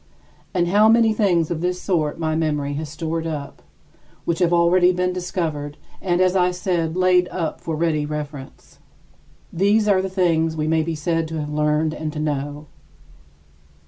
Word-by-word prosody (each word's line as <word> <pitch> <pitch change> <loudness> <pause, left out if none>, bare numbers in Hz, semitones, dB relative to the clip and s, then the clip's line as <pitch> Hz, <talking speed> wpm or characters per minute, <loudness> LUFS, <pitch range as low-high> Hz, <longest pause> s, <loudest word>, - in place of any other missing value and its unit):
And 175 -2 0
how 210 +3 +5
many 225 -1 +4
things 175 -7 +1
of 165 -2 -2
this 180 +1 -1
sort 160 -7 -1
my 160 -1 -1
memory 150 -3 -1
has 150 +1 -4
stored 165 +1 -3
up, 150 -3 -6 0.6
which 170 -1 -1
have 175 -2 +2
already 175 +1 +4
been 180 0 -1
discovered 160 -5 -3 0.2
and, 175 -2 0
as 185 0 +3
I 180 -1 +3
said, 180 -2 -2
laid 180 -1 +4
up 165 -4 -4
for 160 - -3
ready 155 -2 0
reference. 150 -2 -8 0.7
These 205 +4 +2
are 195 -2 +4
the 190 - -3
things 165 -4 +1
we 155 0 -1
may 160 0 +2
be 160 +1 -3
said 165 +1 -1
to 160 0 -4
have 150 0 -4
learned 150 +1 +1
and 155 -1 -4
to 155 - -5
know. 145 0 -3
165 Hz, 175 wpm, -21 LUFS, 155-180 Hz, 0.7 s, how